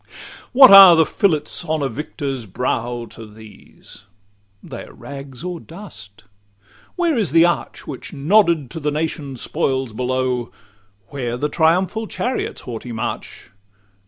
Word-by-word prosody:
What 260 -2 +8
are 195 -3 +11
the 160 -1 +4
fillets 175 -4 -1
on 155 -2 -2
the 140 - 0
victor's 135 -1 -5
brow 120 +3 -3
To 115 0 -10
these? 105 -2 -16 0.6
They - - -8
are - - -15
rags 140 -1 -10
or 180 -1 -5
dust. 160 - -12 0.7
Where 345 -3 +1
is 215 - 0
the 165 +2 +5
arch 175 - -2
Which 135 - -8
nodded 165 - +2
to 165 - -6
the 150 -1 -1
nation's 150 -4 -4
spoils 130 -3 -2
below? 125 0 -2 0.6
Where 125 -4 -4
the 150 +4 -2
triumphal 185 +8 +1
chariots' 250 +4 -3
haughty 120 0 -7
march? 115 +1 -6
145 Hz, 135 wpm, -20 LUFS, 125-170 Hz, 0.7 s, are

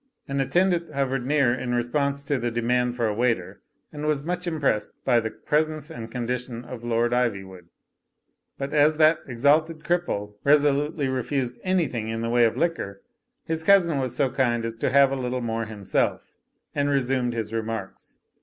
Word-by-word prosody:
An 140 0 -1
attendant 175 +3 +1
hovered 135 -3 -1
near 140 -4 +3
in 125 -1 -2
response 140 +4 0
to 140 -1 -1
the 120 0 -1
de 120 0 -3
mand 125 0 +1
for 120 -2 0
a 110 - 0
waiter, 115 -5 -1 0.3
and 150 0 -6
was 150 -2 0
much 180 +2 -3
impressed 145 -10 0
by 120 -2 +4
the 110 -1 -2
presence 155 +3 -1
and 115 -5 -7
condition 125 0 -4
of 120 -2 -8
Lord 120 0 +1
Ivywood. 95 -7 -2 0.9
But 140 +1 -4
as 150 +1 +4
that 155 +1 +5
exalted 150 +6 +2
cripple 170 -13 -1
resolutely 145 +1 +3
refused 130 -1 -2
an3rthing 155 - 0
in 115 0 -3
the 115 0 -2
way 120 0 +5
of 115 - 0
liquor, 130 - -2 0.4
his 160 0 -2
cousin 170 -5 +4
was 130 -2 -2
so 135 -1 +1
kind 120 -3 +1
as 115 0 -4
to - - 0
have 135 0 +5
a - - 0
little 125 -1 -2
more 115 -1 -2
himself, 105 -3 -2 0.4
and 145 0 0
resumed 130 -3 +1
his 110 -1 -4
remarks. 115 0 -5
130 Hz, 175 wpm, -25 LUFS, 115-150 Hz, 0.9 s, that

